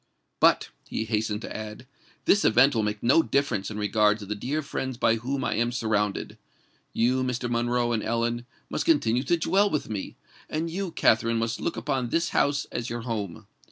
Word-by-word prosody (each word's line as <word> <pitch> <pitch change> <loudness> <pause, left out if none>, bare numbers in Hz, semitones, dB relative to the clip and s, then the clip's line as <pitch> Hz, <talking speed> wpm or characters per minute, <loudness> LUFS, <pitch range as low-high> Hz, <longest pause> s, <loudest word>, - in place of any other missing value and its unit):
"But," - - +4 0.2
he 110 - -3
hastened 110 -1 -1
to - - -6
add, 110 +2 -7 0.4
"this 200 - +4
event 125 +6 +5
will 115 - +1
make 105 0 -2
no 135 +8 +5
difference 130 -11 0
in 105 - -6
regard 105 0 +3
to 105 - -9
the 105 - -3
dear 140 +9 -2
friends 130 -2 -4
by 115 -2 +3
whom 130 +4 -3
I - - 0
am 120 +2 0
surrounded. 105 -4 -1 0.5
You, 125 +3 +2
Mr. 125 -1 -2
Monroe 120 0 0
and 115 -2 0
Ellen, 115 +2 -1 0.2
must - - -2
continue 125 -7 +3
to 155 +6 +1
dwell 195 +5 +2
with 150 - -2
me; 100 -3 -5 0.3
and 165 +2 -2
you, 190 +2 -3
Katherine, 115 -6 +2
must 115 0 -2
look - - -2
upon 125 0 -1
this 165 +4 +1
house 140 0 +1
as 120 0 -3
your 120 0 -4
home. 110 -7 -4
120 Hz, 195 wpm, -26 LUFS, 110-135 Hz, 0.5 s, event